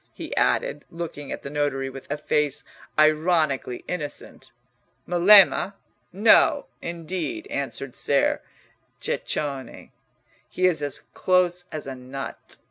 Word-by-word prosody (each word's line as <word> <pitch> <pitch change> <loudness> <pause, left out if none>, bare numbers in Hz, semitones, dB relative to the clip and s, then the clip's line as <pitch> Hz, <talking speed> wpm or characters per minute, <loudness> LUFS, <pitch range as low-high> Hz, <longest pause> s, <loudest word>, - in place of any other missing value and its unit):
he - - -6
added, - - +1
looking 165 -4 -6
at - - -5
the - - -5
notary 145 -2 -1
with 135 0 -9
a 145 - -1
face 150 -1 0 0.3
ironically 155 -4 +2
innocent. 150 -5 -6 0.6
"Melema? 195 +2 +6 0.4
no, 225 - +5 0.2
indeed," 170 -1 -4
answered 135 -1 -3
Ser 140 -1 +1 0.6
Ceccone. 140 -3 -3 0.6
"He 185 - 0
is 170 -5 +2
as 145 -1 -3
close 180 -1 +2
as 155 - -5
a 135 - -5
nut. 130 +2 -8
155 Hz, 115 wpm, -24 LUFS, 140-180 Hz, 0.6 s, Melema